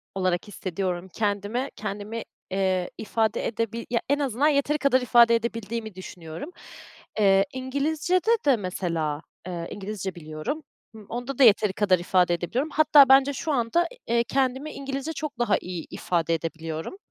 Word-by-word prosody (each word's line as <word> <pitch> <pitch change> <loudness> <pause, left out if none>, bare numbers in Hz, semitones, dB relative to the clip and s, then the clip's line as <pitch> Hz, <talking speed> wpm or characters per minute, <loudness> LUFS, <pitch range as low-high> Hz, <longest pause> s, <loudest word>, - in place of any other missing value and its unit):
olarak 185 0 0
hissediyorum. 185 -2 -4
Kendime, 210 +5 -1
kendimi, 210 +2 -5 0.3
eee, 185 -2 0
ifade 220 0 0
edebi 230 +1 -3
ya, 235 -1 +1
en 285 +1 +2
azından 275 0 +1
yeteri 290 +1 +2
kadar 275 -3 +3
ifade 235 -1 +6
edebildiğimi 230 -2 -3
düşünüyorum. 175 - -8 0.7
Eee, 195 -1 +5
İngilizce'de 305 - 0
de, 275 -3 +5
mesela, 170 -6 -2 0.3
eee, 170 -2 -4
İngilizce 195 -2 -5
biliyorum, 155 - -5 0.3
ımm, 215 -2 -12
onda 245 +3 -4
da - - +7
yeteri 210 -3 +5
kadar 190 -3 +3
ifade 180 0 +2
edebiliyorum. 205 - -2
Hatta 295 -3 +6
bence 270 +1 +6
şu 310 +4 -3
anda, 275 +8 +1 0.2
eee, 235 0 +2
kendimi 265 +3 0
İngilizce 275 +3 -4
çok 300 -4 -5
daha 225 -4 +3
iyi 175 -2 -6
ifade 170 -2 0
edebiliyorum. 165 - -5
220 Hz, 145 wpm, -25 LUFS, 185-270 Hz, 0.7 s, da